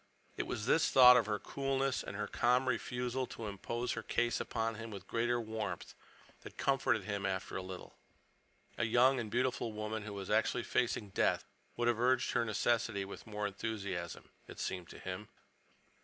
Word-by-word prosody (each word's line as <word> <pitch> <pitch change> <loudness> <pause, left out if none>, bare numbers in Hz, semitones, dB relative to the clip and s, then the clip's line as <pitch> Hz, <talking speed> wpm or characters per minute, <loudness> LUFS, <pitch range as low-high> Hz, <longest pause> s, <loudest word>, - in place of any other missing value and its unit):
It - - -3
was 105 - -3
this 160 +6 +4
thought 125 -1 +9
of 120 -4 +3
her 105 -1 0
coolness 135 +2 -1
and - - -7
her 105 +1 -2
calm 125 +2 +2
refusal 125 +1 -1
to 115 - -7
impose 115 +4 -3
her 115 - -2
case 120 +1 0
upon 115 0 -1
him 115 +1 -7
with 100 -3 -8
greater 120 +1 +1
warmth 110 -5 -4 0.5
that - - -11
comforted 130 -6 +2
him 100 0 -3
after 95 -1 -2
a - - -1
little. 95 0 -8 0.9
A 120 - +2
young 125 +4 +4
and 110 -3 -3
beautiful 120 0 0
woman 110 +1 -3
who 105 0 -6
was 100 -1 -5
actually 110 +3 +2
facing 110 -4 0
death - - +1 0.3
would 120 0 +1
have 120 -2 +2
urged 125 +1 +3
her 120 - +2
necessity 110 -2 +1
with 100 - -9
more 105 -1 -3
enthusiasm, 100 -4 -4 0.2
it - - -10
seemed 90 -2 -3
to - - -10
him. 95 +3 -6
110 Hz, 180 wpm, -34 LUFS, 100-120 Hz, 0.9 s, thought